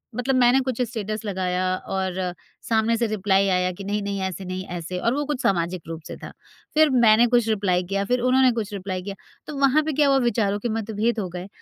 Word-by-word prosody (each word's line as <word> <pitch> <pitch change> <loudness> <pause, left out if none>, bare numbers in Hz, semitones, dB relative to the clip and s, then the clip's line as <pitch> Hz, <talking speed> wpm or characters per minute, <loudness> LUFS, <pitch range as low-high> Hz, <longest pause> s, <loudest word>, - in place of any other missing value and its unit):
मतलब 260 +2 0
मैंने 250 +1 +5
कुछ 255 -2 -2
स्टेटस 215 -3 -3
लगाया 185 -2 -1 0.3
और 190 -1 -1 0.6
सामने 225 0 +2
से 235 0 +1
रिप्लाई 195 -2 +1
आया 180 0 +1
कि 195 - -9
नहीं-नहीं 200 0 -2
ऐसे 190 0 -4
नहीं 185 +1 -5
ऐसे 175 +2 -5
और 230 - +1
वो 295 - -1
कुछ 290 -3 -3
सामाजिक 175 -2 0
रूप 165 0 -6
से - - -7
था। - - -7 0.4
फिर 310 0 +5
मैंने 225 +2 +6
कुछ 240 -1 +2
रिप्लाई 190 -4 +1
किया 195 +2 -2
फिर 250 +4 +1
उन्होंने 255 0 +4
कुछ 220 -3 -4
रिप्लाई 185 -1 -4
किया, 195 +1 -6 0.3
तो 300 - -6
वहाँ 280 +3 +4
पे 310 -1 -2
क्या 290 0 +3
हुआ 275 -1 +4
विचारों 205 -3 0
के 240 - -3
मतभेद 225 +1 -1
हो 185 -4 -3
गए 180 +2 -7
210 Hz, 215 wpm, -23 LUFS, 190-245 Hz, 0.6 s, मैंने